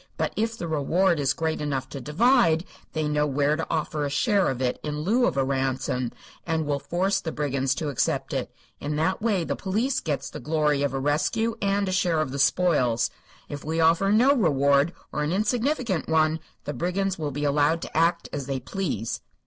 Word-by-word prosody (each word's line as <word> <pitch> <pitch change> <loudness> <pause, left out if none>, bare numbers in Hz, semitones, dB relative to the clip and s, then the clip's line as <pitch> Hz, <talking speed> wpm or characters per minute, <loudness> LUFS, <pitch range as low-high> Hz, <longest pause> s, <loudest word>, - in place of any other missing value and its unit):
But - - -1
if 225 +1 -1
the 170 - -4
reward 165 +3 +2
is 135 -1 +2
great 160 +2 -2
enough 135 -3 -2
to 140 - -7
divide, 165 - +3 0.3
they 155 -1 -1
know 150 0 +1
where 145 +1 +1
to 165 - -3
offer 155 -2 -1
a 145 - -1
share 200 - +2
of 130 -2 -3
it, 125 -1 -1
in 150 0 -3
lieu 235 +9 +2
of - - -2
a 135 - +3
ransom, 130 -2 -1 0.3
and 160 -2 -1
will 145 -1 -1
force 190 +6 0
the 160 - -4
brigands 135 -3 -1
to 155 -3 -3
accept 140 - -1
it. - - -2 0.3
In 150 +1 -3
that 160 +7 0
way 210 -6 +1
the - - -2
police 225 +8 -1
gets 150 -4 -3
the - - -7
glory 150 0 +1
of 140 -2 0
a - - -1
rescue 155 +11 0
and 200 0 +1
a - - -1
share 180 -3 +1
of 155 -4 -1
the 140 - -4
spoils. 140 -7 +2 0.4
If 145 -1 -7
we 160 +2 -2
offer 165 +4 +4
no 245 +6 +5
reward, 140 - +3 0.2
or 150 - -2
an 150 +1 0
insignificant 225 - 0
one, 160 0 +2 0.2
the 145 - -4
brigands 185 +2 -1
will 150 -2 -2
be 145 +1 -4
allowed 145 +3 +2
to - - -8
act 170 +1 +2
as 140 -2 -4
they 135 -1 -2
please." 140 - -3
155 Hz, 205 wpm, -25 LUFS, 145-185 Hz, 0.4 s, no